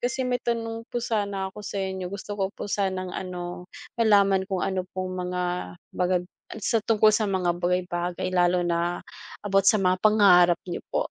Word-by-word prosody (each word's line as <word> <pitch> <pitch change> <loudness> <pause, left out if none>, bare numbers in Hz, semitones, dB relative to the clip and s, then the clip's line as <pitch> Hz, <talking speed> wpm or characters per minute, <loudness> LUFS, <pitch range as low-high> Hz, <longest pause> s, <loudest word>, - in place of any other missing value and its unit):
kasi 250 +2 -1
may 250 0 0
tanong 230 0 -3
po - - -6
sana 200 -4 -2
ako 210 - -9
sa 205 - -6
inyo 190 -1 -4
gusto 200 +2 -6
ko 190 - +1
po 200 - -8
sanang 190 -2 -2
ano, 180 -1 -6 0.3
malaman 200 -3 +4
kung 190 -2 -1
ano 185 -1 -2
pong 185 0 -3 0.2
mga 180 0 -2 0.5
bagag 180 0 0 0.3
ay - - -6
sa 220 - +1
tungkol 215 -1 +4
sa 215 +1 +2
mga 185 -3 +1
bagay-bagay 175 0 -1
lalo 180 0 +3
na 175 0 0 0.4
about 195 -1 +2
sa - - +5
mga 185 -1 +3
pangarap 185 -4 +5
niyo 175 - -5
po - - 0
190 Hz, 180 wpm, -26 LUFS, 180-205 Hz, 0.5 s, sa